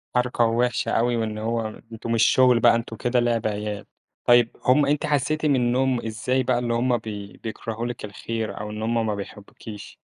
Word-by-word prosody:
حركة 125 -1 +2
وحشة 120 +2 0
أوي 120 +1 +2
وإن 110 -1 -2
هو 110 0 -3
أنتم 115 +1 -5
مش 115 -1 +3
شغل 125 -2 +5
بقى 120 0 +5
أنتم 115 -1 -4
كده 125 +2 0
لعب 120 -2 +1
عيال، 105 0 -4 0.4
طيّب 120 -1 +4
هم 135 +3 +5
أنتِ 145 +1 0
حسّيتي 150 +2 0
منهم 130 -2 +1
إزاي 125 +4 -1
بقى 120 - +1
اللي 120 -1 -1
همّ 120 +1 +2
بي 105 -3 -8
بيكرهوا 115 +1 -5
لِك 120 -2 -5
الخير، 110 +2 -5
أو 105 - -5
إن 105 +1 -6
هُم 115 0 0
ما 105 -2 -1
بيحبوكيش؟ 105 +1 -9
115 Hz, 185 wpm, -24 LUFS, 110-125 Hz, 0.4 s, شغل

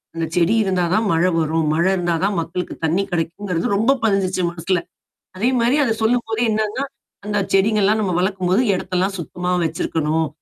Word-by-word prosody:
அந்த 165 0 -1
செடி 180 +6 +3
இருந்தா 185 -2 0
தான் 220 0 +2
மழை 170 +3 +3
வரும். 160 0 0
மழை 170 +4 +2
இருந்தா 175 -2 0
தான் 200 -2 +1
மக்களுக்கு 175 +2 -4
தண்ணி 175 +5 +1
கெடைக்குங்கிறது 175 +2 -2
ரொம்ப 225 +6 +3
பதிஞ்சுச்சு 195 -3 +1
மனசுல. 175 +1 -1 0.6
அதே 230 +7 +1
மாரி 240 +4 +3
அத 225 -4 +1
சொல்லும்போதே 230 0 +1
என்னன்னா 215 +5 -1 0.4
அந்த 210 0 -1 0.2
செடிங்கலாம் 210 +1 +3
நம்ம 185 -4 -1
வளர்க்கும்போது 185 +2 +1
எடத்தெல்லாம் 185 +1 -1
சுத்தமா 180 +2 -4
வச்சிருக்கணும். 160 -1 -1
185 Hz, 155 wpm, -20 LUFS, 170-210 Hz, 0.6 s, செடி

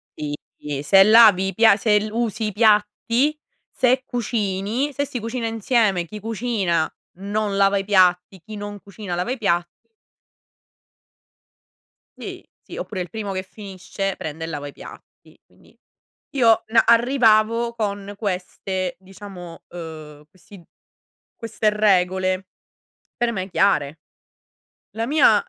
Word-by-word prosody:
sì 150 -1 -5 0.2
sì, 145 -2 -5
se 195 +5 +6
lavi 210 -3 +6
i 195 - -3
pia 225 0 +6
se 210 0 +2
usi 225 -1 -2
i - - -3
piatti, 225 +7 +2 0.3
se 255 +1 +2
cucini, 225 +2 -2
se 285 +1 -1
si 255 -3 -5
cucina 230 +1 -3
insieme, 220 -5 +1
chi 210 +5 -9
cucina 205 -7 -1 0.3
non 205 +1 -2
lava 200 0 +3
i 195 - -1
piatti, 185 -1 +2
chi 215 -1 -9
non 205 0 -7
cucina 200 -2 -8
lava 180 +8 -2
i 265 - -2
piatti. 175 -5 0 2.5
Sì, - - -8 0.2
sì, - - -11
oppure 190 -4 -5
il 175 - -6
primo 210 -3 -5
che 190 0 -2
finisce 195 -1 -6
prende 160 +1 -6
e - - -4
lava 145 -3 -5
i 145 - -10
piatti. - - -15
Quindi - - -25 0.6
io, 230 -4 +4
uhm, 225 +1 +4
arrivavo 235 -1 +3
con 205 -2 -4
queste 185 -2 -3
diciamo, 190 -3 -11
uhm, 155 -3 -10
questi 185 0 -16 0.7
queste 225 -1 -1
regole 185 -2 +1 0.7
per 240 -1 0
me 190 -2 -4
chiare. 160 -6 +1 1.0
La 225 +1 -1
mia 260 -7 +4
205 Hz, 130 wpm, -22 LUFS, 185-225 Hz, 2.5 s, se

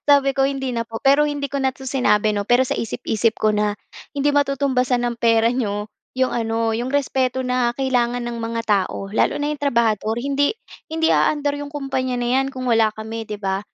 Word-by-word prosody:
Sabi 280 -1 +5
ko, 270 0 +3
"Hindi 270 -2 -2
na 230 0 -2
po." 225 -1 -6
Pero 280 +2 +5
hindi 290 -1 -2
ko 280 - -2
na 265 -1 +1
'to 265 - -11
sinabi, 215 -5 +2
‘no, 200 - -1
pero 245 +2 +4
sa - - -2
isip-isip 225 0 -1
ko 215 - +2
na, 210 0 +1 0.4
"Hindi 285 +1 +2
matutumbasan 265 -3 +1
ng 240 -1 -2
pera 230 0 +4
niyo 210 -4 -2 0.3
‘yong 260 0 +1
ano, 225 -1 0
‘yong 240 +3 -2
respeto 260 -2 0
na 250 -1 0
kailangan 245 -2 0
ng 240 0 -4
mga 230 0 -2
tao, 195 -1 0
lalo - - +2
na 295 +1 -1
‘yong 295 - -7
trabahador." 225 -5 +1
Hindi 280 - +1 0.4
hindi 320 0 +1
aandar 290 -1 +1
‘yong 290 0 -7
kumpanya 265 -3 -2
na 240 - -1
‘yan 270 - -1
kung 255 -1 -6
wala 225 -2 +4
kami, 220 +1 -6
‘di 210 - -4
ba? 195 -1 -2
245 Hz, 205 wpm, -21 LUFS, 225-275 Hz, 0.4 s, Sabi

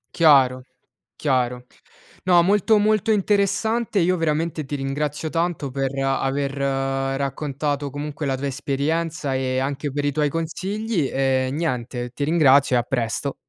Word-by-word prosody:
Chiaro, 130 -6 +4 0.5
chiaro. 125 -3 -1 0.6
No 175 -2 +5
molto, 205 +3 +3
molto 215 +1 +2
interessante, 210 +2 +1
io 180 0 +3
veramente 160 0 -1
ti 145 +1 -5
ringrazio 145 +3 -3
tanto 165 -5 -1
per 135 0 -1
aver 135 +1 0 0.7
raccontato 140 +1 -2
comunque 145 +1 -5
la 135 -1 0
tua 140 - -4
esperienza, 145 +2 -2
e 130 -1 -1
anche 140 +2 -2
per 145 +1 -2
i 145 - +1
tuoi 150 +1 +1
consigli, 175 - -2
e 130 -1 +1
niente, 125 -5 -3
ti 140 - -2
ringrazio 140 -4 +4
e - - +4
a - - -1
presto. 120 +2 -2
145 Hz, 140 wpm, -22 LUFS, 135-165 Hz, 0.7 s, No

